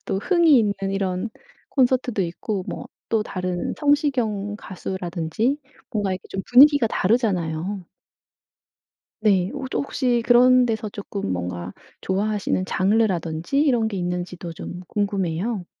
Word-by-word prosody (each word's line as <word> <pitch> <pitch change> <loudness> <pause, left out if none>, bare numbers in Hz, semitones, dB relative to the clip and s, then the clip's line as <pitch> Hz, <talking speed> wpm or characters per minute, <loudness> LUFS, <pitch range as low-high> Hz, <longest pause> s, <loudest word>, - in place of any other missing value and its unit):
또 190 - -1
흥이 330 - +4
있는 205 -3 +2 0.2
이런 190 +2 -1 0.4
콘서트도 250 -5 +2
있고 185 +3 -3
뭐 - - -5 0.2
또 220 -2 +1
다른 180 -3 -3
성시경 250 -9 +1
가수라든지 190 - -3 0.3
뭔가 205 -3 0
이렇게 185 -1 -4
좀 190 - -4
분위기가 275 -1 +7
다르잖아요. 185 -5 0 1.3
네. 195 -4 +3
홋 265 - -4
혹시 250 -4 0
그런 250 +1 +6
데서 220 -2 -2
쪼끔 200 - -4
뭔가 90 0 -4 0.3
좋아하시는 200 -1 0
장르라든지 190 - +1
이런 245 -7 +3
게 205 - -5
있는지도 180 -1 -4
좀 175 +2 -7
궁금해요. 195 0 -1
205 Hz, 280 characters per minute, -23 LUFS, 180-240 Hz, 1.3 s, 분위기가